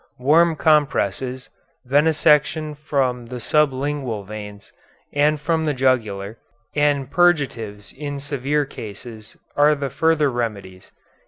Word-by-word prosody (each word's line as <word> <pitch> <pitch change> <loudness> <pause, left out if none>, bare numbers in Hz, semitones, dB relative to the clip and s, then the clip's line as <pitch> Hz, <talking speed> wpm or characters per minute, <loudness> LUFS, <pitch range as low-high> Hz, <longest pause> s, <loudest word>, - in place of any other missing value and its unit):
Warm 160 +6 +4
compresses, 130 -5 0 0.4
venesection 150 +1 +2
from 130 -5 -1
the 125 +1 -6
sublingual 135 -6 0
veins, 105 0 -9 0.4
and 150 +1 +2
from 160 +1 0
the 150 - 0
jugular, 110 -5 0 0.4
and 145 -2 +1
purgatives 130 -12 0
in 145 0 -5
severe 140 +1 -1
cases, 110 -2 -10 0.2
are 150 +1 +4
the 140 -2 -4
further 160 -3 +2
remedies. 100 -6 -5
140 Hz, 105 wpm, -21 LUFS, 115-150 Hz, 0.4 s, Warm